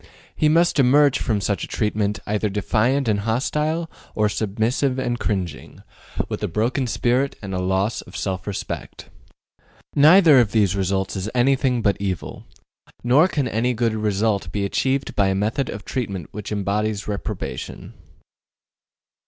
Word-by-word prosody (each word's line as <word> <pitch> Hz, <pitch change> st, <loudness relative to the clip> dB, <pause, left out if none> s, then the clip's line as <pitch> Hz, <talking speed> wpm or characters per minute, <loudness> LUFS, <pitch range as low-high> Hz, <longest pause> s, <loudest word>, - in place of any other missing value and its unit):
He 155 Hz, -, +2 dB
must 170 Hz, 0 st, +3 dB
emerge 140 Hz, +1 st, +5 dB
from 110 Hz, -3 st, 0 dB
such 100 Hz, 0 st, -1 dB
a -, -, -4 dB
treatment 105 Hz, -1 st, -1 dB
either 105 Hz, 0 st, -1 dB
defiant 110 Hz, +7 st, +1 dB
and 105 Hz, -2 st, +2 dB
hostile, 150 Hz, +9 st, -1 dB, 0.3 s
or 105 Hz, -1 st, +2 dB
submissive 115 Hz, +6 st, 0 dB
and 120 Hz, -2 st, -2 dB
cringing, 90 Hz, -9 st, -4 dB, 0.4 s
with -, -, -5 dB
a -, -, 0 dB
broken 120 Hz, -, -1 dB
spirit 125 Hz, +4 st, 0 dB
and 95 Hz, -1 st, -5 dB
a 90 Hz, -, -1 dB
loss 95 Hz, +4 st, 0 dB
of -, -, -10 dB
self 95 Hz, -2 st, -3 dB
respect. 100 Hz, -, -6 dB, 0.8 s
Neither 155 Hz, 0 st, +7 dB
of 115 Hz, -4 st, +2 dB
these 100 Hz, -4 st, +3 dB
results 95 Hz, 0 st, -1 dB
is 95 Hz, +2 st, -3 dB
anything 125 Hz, -1 st, +2 dB
but 100 Hz, -3 st, +2 dB
evil. 95 Hz, -3 st, -4 dB, 0.6 s
Nor 135 Hz, +8 st, +5 dB
can 145 Hz, -8 st, -1 dB
any 120 Hz, +2 st, 0 dB
good 115 Hz, -1 st, +1 dB
result 105 Hz, -3 st, 0 dB
be 100 Hz, 0 st, -1 dB
achieved 135 Hz, +7 st, -1 dB
by 100 Hz, -, +3 dB
a 95 Hz, -, +1 dB
method 110 Hz, +7 st, -1 dB
of 100 Hz, -1 st, -7 dB
treatment 100 Hz, -, -4 dB
which 105 Hz, 0 st, -7 dB
embodies 105 Hz, +1 st, -1 dB
reprobation. 100 Hz, -1 st, -5 dB
110 Hz, 150 wpm, -22 LUFS, 100-130 Hz, 0.8 s, Neither